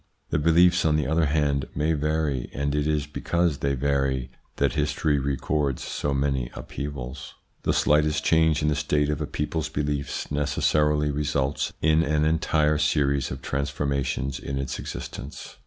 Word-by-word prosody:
The - - +2
beliefs, 85 +3 +4
on 75 -1 +3
the 75 -2 +1
other 80 +2 +2
hand, 70 -2 +1
may 75 +3 +1
vary, 75 -4 -1
and 70 +1 -1
it 75 0 0
is 75 -2 0
because 85 +1 -1
they 70 0 0
vary 65 -2 0 0.2
that 70 -3 +1
history 75 -2 +1
records 70 0 -1
so 70 - -2
many 70 -3 0
upheavals. 70 -2 -6 0.3
The - - +1
slightest 75 +1 +2
change 80 -2 +3
in 75 - +3
the 75 - +1
state 75 0 +1
of 75 +1 -3
a 75 - -2
people's 75 +1 -2
beliefs 70 -1 -3
necessarily 75 +1 +1
results 70 -1 -1
in 80 +1 +4
an 75 -1 +1
entire 75 -1 +2
series 70 -3 +1
of 65 0 -7
trans 70 +1 -1
formations 70 -2 -2
in 70 - -4
its 70 -1 -3
existence. 70 +3 -7
75 Hz, 160 wpm, -25 LUFS, 70-75 Hz, 0.3 s, beliefs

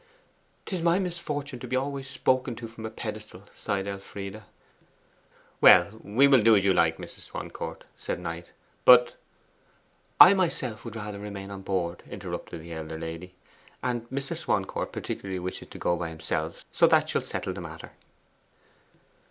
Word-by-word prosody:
''Tis 185 -4 -2
my 170 +1 +3
misfortune 150 -8 -3
to 125 - -7
be 130 - -1
always 135 0 -2
spoken 130 -2 +1
to 115 0 -7
from 110 0 -7
a - - -5
pedestal,' 110 -3 -7
sighed 100 -2 -2
Elfride. 100 +1 -6 1.2
'Well, 95 +5 +7
we 120 +8 +4
will 135 -4 +6
do 110 +1 +6
as 100 -1 +3
you 95 - +5
like, 80 -2 +3
Mrs. - - -10
Swancourt,' - - -6
said - - -4
Knight, 85 0 -5 0.4
'but 120 -1 +7 0.5
' - - -37
'I 180 - +11
myself 130 - -1
would 115 -1 -7
rather 105 -2 -5
remain 100 -1 -7
on 100 -1 -7
board,' 90 -3 -2
interrupted 85 -2 -6
the 85 0 -8
elder 80 0 -6
lady. 80 +3 -7 0.5
'And 120 -2 -2
Mr. 135 +1 -3
Swancourt - - -1
particularly 95 -1 -4
wishes 90 +1 -5
to - - -11
go 85 - +1
by 85 -1 -3
himself. 80 0 -4
So - - +5
that - - +4
shall - - 0
settle - - -4
the - - -7
matter. - - -9
105 Hz, 160 wpm, -27 LUFS, 90-130 Hz, 1.2 s, I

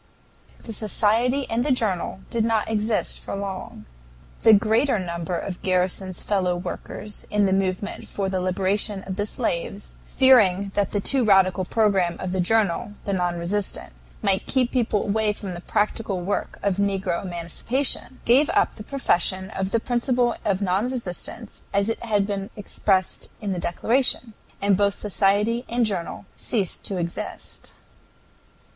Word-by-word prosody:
The 225 - -7
society 230 +6 +1
and 230 +2 0
the 290 - 0
journal 200 -6 -1
did 230 -1 +1
not 225 -1 +1
exist 220 0 0
for - - -6
long. 190 - -6 0.5
The - - +6
greater 220 +4 +4
number 170 -1 -3
of 185 -3 -5
Garrison's 185 0 0
fellow 185 -3 +1
workers 185 +3 -6
in 210 -1 +2
the 190 - +2
movement 195 +1 -2
for 195 -1 -2
the 190 -1 -1
liberation 195 +2 0
of 190 - -5
the 205 +1 -2
slaves, 200 -3 -2 0.2
fearing 200 -8 +5
that 200 -2 +1
the 205 - -1
too 265 +4 +4
radical 190 -3 +4
programme 195 -5 +2
of 185 - -3
the 185 - -1
journal, 205 0 +1
the 200 - -1
NON 175 -2 0
RESISTANT, 190 +4 -3 0.3
might 195 -2 +2
keep 255 -2 +1
people 230 -5 +1
away 210 +1 +1
from 200 -3 -6
the 175 - -7
practical 205 -1 -1
work 195 +4 -2
of 200 -2 +1
negro 195 -3 0
emancipation, 195 - 0
gave 265 +6 +5
up - - +3
the 210 - -9
profession 190 -6 0
of 190 -2 -2
the 230 - +1
principle 245 0 +1
of 200 0 0
non 195 +6 +1
resistance 230 -1 -3
as 200 +2 +2
it 225 - -3
had 205 -3 +2
been 200 -1 -3
expressed 195 -2 0
in 205 -2 -3
the 180 - -3
declaration, 235 +6 +1 0.3
and 200 -1 +4
both 200 0 +2
society 210 +3 +1
and 240 0 +2
journal 195 -3 -3
ceased 205 -7 0
to 195 - -1
exist. 170 -1 -4
200 Hz, 155 wpm, -24 LUFS, 185-225 Hz, 0.5 s, The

